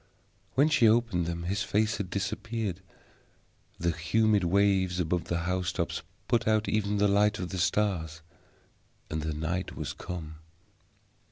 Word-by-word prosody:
When 140 +3 +5
she 140 -7 +5
opened 110 -7 +2
them 85 0 -3
his 100 +4 -1
face 105 +2 +1
had 95 -3 -4
disappeared; 100 0 -3 1.0
the 85 0 +1
humid 105 +5 +2
waves 95 0 +2
above 90 0 0
the 85 0 -1
house 90 +1 -1
tops 85 -2 -2 0.3
put 120 -3 +1
out 110 -1 +2
even 105 -1 0
the 105 0 +4
light 105 +1 +3
of 90 - -4
the 95 - -4
stars, 85 -4 0 0.9
and 80 0 -2 0.2
night 85 +3 -2
was - - -4
come. 80 -3 -7
95 Hz, 145 wpm, -29 LUFS, 85-105 Hz, 1.0 s, When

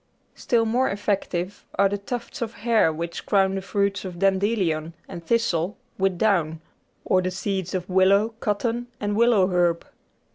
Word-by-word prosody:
Still 230 -2 +1
more 245 +4 +1
effective 195 -2 -2
are 200 - +4
the 200 +1 -3
tufts 235 +5 -6
of 230 -1 -3
hair 225 -8 +4
which 165 +2 -5
crown 195 -2 +3
the 195 - -2
fruits 200 0 -1
of 185 -2 -7
dandelion 190 -4 +1
and 170 - -8
thistle 190 -3 0 0.2
with 190 -1 +1
down, 170 -7 +1 0.5
or 185 - +3
the 185 - -1
seeds 190 -1 -3
of 180 -1 -3
willow, 195 +3 +4
cotton, 235 +3 -1
and 205 0 -1
willow 230 -4 +4
herb. 175 -2 +1
195 Hz, 155 wpm, -24 LUFS, 180-215 Hz, 0.5 s, are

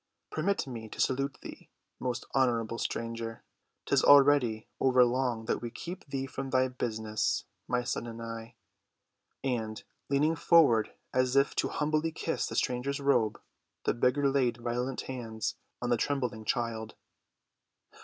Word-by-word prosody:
Permit 195 +6 0
me 115 -4 -7
to - - -10
salute 135 +1 +1
thee, - - -10 0.3
most 125 -1 -3
honorable 115 -4 +1
stranger, 115 -1 -4 0.4
'tis - - +3
already 140 -6 +6
over 130 -1 +5
long 120 -2 0
that - - -1
we 120 - -4
keep 175 +10 -8
thee 135 -1 -2
from 135 0 -5
thy 130 0 +3
business—my 115 0 -2
son 120 -1 -2
and 115 0 -7
I." 115 0 -7 0.9
And, 110 -5 -2 0.3
leaning 150 +4 +3
forward 145 -10 +5 0.2
as 130 0 +2
if 140 0 +4
to - - +2
humbly 155 +2 0
kiss 160 +1 -2
the - - -5
stranger's 130 +3 0
robe, 125 -6 +2 0.4
the - - +2
beggar 125 +5 +2
laid 130 -4 +2
violent 120 +2 -2
hands 115 -4 -4 0.3
on 120 - 0
the 120 - +4
trembling 125 -5 -1
child. 115 -2 -2
125 Hz, 140 wpm, -30 LUFS, 115-140 Hz, 0.9 s, already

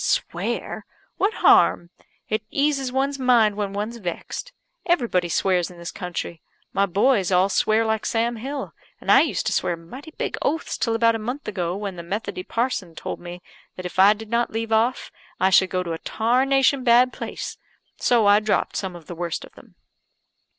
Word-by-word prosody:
"Swear! - - -2 0.3
What 400 - +2
harm? 170 0 +5 0.4
It 215 0 -1
eases 275 -2 0
one's 275 +2 -1
mind 235 -5 +4
when 205 -1 -2
one's 210 +4 -4
vexed. 200 - -5 0.3
Everybody 235 - +1
swears 180 0 +1
in 180 - -13
this 170 0 -6
country. 175 -3 -5 0.3
My 200 0 +2
boys 200 0 +2
all 185 +2 +4
swear 215 +3 +2
like 220 -1 -1
Sam 235 0 0
Hill; 270 +4 -5 0.3
and - - 0
I - - +8
used - - -1
to - - 0
swear 170 - 0
mighty 250 - -11
big - - -3
oaths 320 +3 -1
till 230 -1 0
about 230 0 +4
a 225 - -3
month 245 +6 -5
ago, 180 -4 -2
when 200 -2 -5
the - - -5
Methody 200 +2 -4
parson 205 -6 -2
told - - -5
me 175 0 -9 0.3
that 185 - -8
if 180 - -5
I 200 +2 +8
did 215 +1 -11
not 235 +1 +1
leave 225 0 -4
it - - +5
off 235 +4 0 0.3
I 190 +1 +3
should 190 0 +5
go 185 -1 -1
to 170 -2 -4
a 165 - -5
tarnation 265 +4 +2
bad 250 +1 +5
place; - - -6 0.4
so 235 -3 +3
I 205 +1 +6
dropped 215 -1 0
some 190 -3 -4
of 170 -2 -12
the 175 - -7
worst 170 -1 -4
of - - -19
them." - - -18
215 Hz, 190 wpm, -23 LUFS, 180-245 Hz, 0.4 s, I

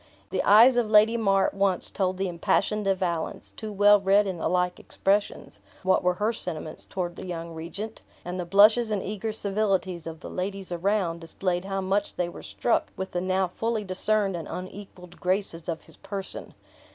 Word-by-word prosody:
The - - 0
eyes 235 +5 +7
of 235 -3 +1
Lady 215 +2 +6
Mar 195 -4 +3
at - - -1
once 195 -2 +2
told 185 -1 -1
the 195 0 -1
impassioned 195 +4 0
De 195 0 +3
Valence, 170 -3 -3
too 215 -1 -6
well 205 0 +5
read 200 +2 +4
in 185 -3 -4
the - - 0
like 180 0 0
expressions, 200 +1 -1 0.2
what 185 0 +3
were 180 0 +2
her 215 +5 0
sentiments 160 -7 -5
toward 175 -2 -4
the - - -8
young 170 -1 -5
regent; 190 +7 -7 0.2
and 180 +1 -4
the - - -1
blushes 215 +5 +5
and 205 -3 -1
eager 215 +2 -3
civilities 195 -5 -1
of 160 -1 -8
the - - -8
ladies 195 0 -4
around 175 -1 0
displayed 175 +2 -2
how 195 0 -2
much 195 +2 0
they 175 -1 -1
were - - -10
struck 240 - -1
with 190 0 -4
the 175 - -2
now 185 0 +1
fully 225 +3 -2
discerned 200 +1 +1
and 165 -2 -5
unequaled 185 -1 -9
graces 180 -3 -1
of 165 -1 -4
his - - -15
person. 195 -1 -6
190 Hz, 190 wpm, -26 LUFS, 180-205 Hz, 0.2 s, eyes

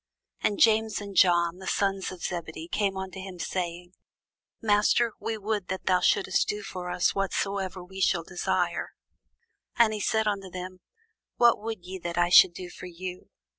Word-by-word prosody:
And 205 - +1
James 220 -1 +4
and 200 -1 -8
John, 175 -1 +4
the 190 - -9
sons 195 -1 0
of 180 -2 -10
Zebedee, 165 -2 -5
come 195 +1 -1
unto 190 0 -6
him, 190 -1 -8
saying, 175 0 -4 0.7
Master, 215 +2 +3
we 225 -1 -3
would 210 -2 -2
that 190 0 -4
thou 185 -1 +3
shouldest 195 +2 +2
do 210 0 -3
for 180 -2 -6
us 180 - +1
whatsoever 195 -1 -2
we 190 +2 -8
shall 175 -2 +2
desire. 175 0 -2 0.8
And 225 -2 +4
he 215 - -3
said 220 +1 +1
unto 195 -2 -2
them, 185 0 -7 0.6
What 235 -3 +4
would 220 -5 -5
ye 190 +1 -6
that 170 0 -5
I 175 0 +3
should 175 0 +7
do 180 -1 -7
for 180 - -9
you? 180 +1 -8
190 Hz, 170 wpm, -27 LUFS, 180-205 Hz, 0.8 s, should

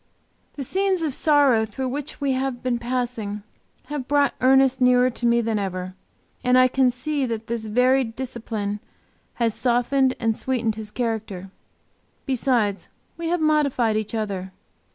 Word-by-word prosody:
The 280 - -4
scenes 380 +4 0
of 300 -4 -1
sorrow 280 -6 +4
through 255 +4 -4
which 285 +3 -5
we 280 -1 0
have 260 -1 -2
been 245 -2 0
passing 235 -4 -3 0.4
have 280 -2 -5
brought 285 -1 +2
Ernest 265 0 +4
nearer 250 0 +4
to 240 - -4
me 235 0 +3
than 225 -2 -1
ever, 185 -1 -4 0.5
and 250 0 +4
I 255 0 +6
can 255 0 +3
see 275 +2 -2
that 225 -1 -4
this 230 -1 -4
varied 250 +1 +2
discipline 220 -5 -4 0.6
has 230 -2 +1
softened 255 +2 +1
and 225 -1 +1
sweetened 235 -3 -1
his 215 -1 -7
character. 215 -5 -4 0.7
Besides, 240 -6 0 0.3
we 335 0 -4
have 345 0 0
modified 280 -7 +2
each 215 +1 -2
other. 195 -4 -3
250 Hz, 155 wpm, -23 LUFS, 220-270 Hz, 0.7 s, I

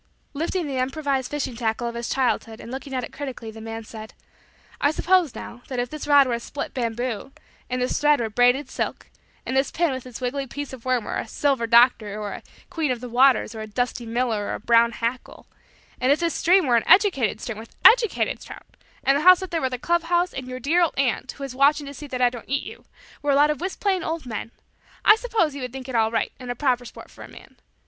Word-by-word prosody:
Lifting 330 +4 -2
the 275 -3 -3
improvised 270 0 -1
fishing 280 -4 -3
tackle 230 0 -1
of 235 - -4
his 235 0 -4
childhood 240 -4 -1
and 235 - -9
looking 270 +1 -6
at 255 - -1
it - - -8
critically 255 -6 -6
the 220 0 -11
man 225 0 -6
said: 220 0 -10 0.7
"I 285 - +4
suppose, 345 -2 +2
now, 245 - -9
that 260 - -5
if 245 0 -2
this 305 -1 -6
rod 285 -1 +6
were 250 - -1
a 235 - -1
split 280 +4 -6
bamboo, 240 0 -3 0.4
and 250 0 -2
this 250 - -1
thread 295 0 +4
were 225 -2 -2
braided 245 +5 +3
silk, - - -4 0.3
and 260 - -3
this 270 +1 +2
pin 340 -2 0
with 260 -1 -6
its 245 - -9
wiggly 270 +2 -3
piece 285 +2 -6
of 255 -2 -10
worm 255 -3 +1
were - - -4
a - - -5
"Silver 270 -5 0
Doctor" 230 -3 +4
or 205 -1 -4
a - - -7 0.3
"Queen 320 -3 -1
of 250 -2 -1
the 250 0 -7
Waters" 250 -1 +4
or 220 - -7
a 215 - -6
"Dusty 245 +1 -2
Miller" 225 -3 -1
or - - -2
a - - -7
"Brown 235 +1 +4
Hackle"; 235 +3 -4 0.5
and 255 +2 +2
if 290 - +3
this 335 -1 0
stream 365 +1 +3
were 245 -3 +4
an 230 - -1
educated 370 - +4
stream, 225 -2 -6
with 225 - -12
educated 460 -2 +5
trout; - - -12 0.3
and 275 - +4
the 285 - +1
house 365 +2 +7
up 375 - -7
there 330 -1 -1
were 260 - 0
a 250 - -3
club 345 +7 +1
house; 350 +1 +1
and 260 -1 -6
your 255 0 -6
dear 320 +8 +2
old 340 - +1
aunt, 260 -1 0
who 280 - -9
is 270 -2 -5
watching 285 +3 +3
to 280 - -8
see 295 +2 -9
that 255 -2 -2
I 245 - +4
don't 240 -2 -10
eat 275 +1 0
you, - - -11 0.4
were 290 - -2
a 280 - +4
lot 295 +2 +5
of 300 - -5
whist 370 +1 -4
playing 385 -3 +1
old 320 -2 -3
men; 225 -2 -5 0.6
I 425 - +9
suppose 445 - 0
you 280 - -7
would 250 -1 -5
think 265 -1 -7
it 260 - -6
all 220 -1 +3
right 225 0 -1
and 250 -1 -8
a 245 - -2
proper 250 -2 0
sport - - -12
for - - -12
a - - -10
man. - - -15
260 Hz, 255 wpm, -24 LUFS, 235-295 Hz, 0.7 s, I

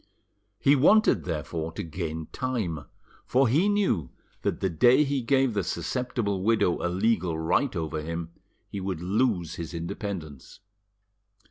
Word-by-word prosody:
He 140 +5 +4
wanted, 215 +11 +4
therefore, 80 -1 -3
to 105 - -4
gain 80 -1 -4
time, 110 - -3 0.4
for 130 +1 +3
he 160 - +3
knew 195 - +1 0.3
that - - -1
the 95 - +1
day 120 - +5
he 140 -2 -1
gave 130 0 +2
the 100 -2 0
susceptible 115 0 -2
widow 105 -4 +2
a 90 - +1
legal 90 -3 +1
right 90 - +1
over 80 -2 -2
him 85 +1 -5 0.4
he 100 - -6
would 95 -3 -3
lose 95 -4 0
his 85 0 -6
independence. 85 - -6
95 Hz, 140 wpm, -27 LUFS, 80-125 Hz, 0.4 s, day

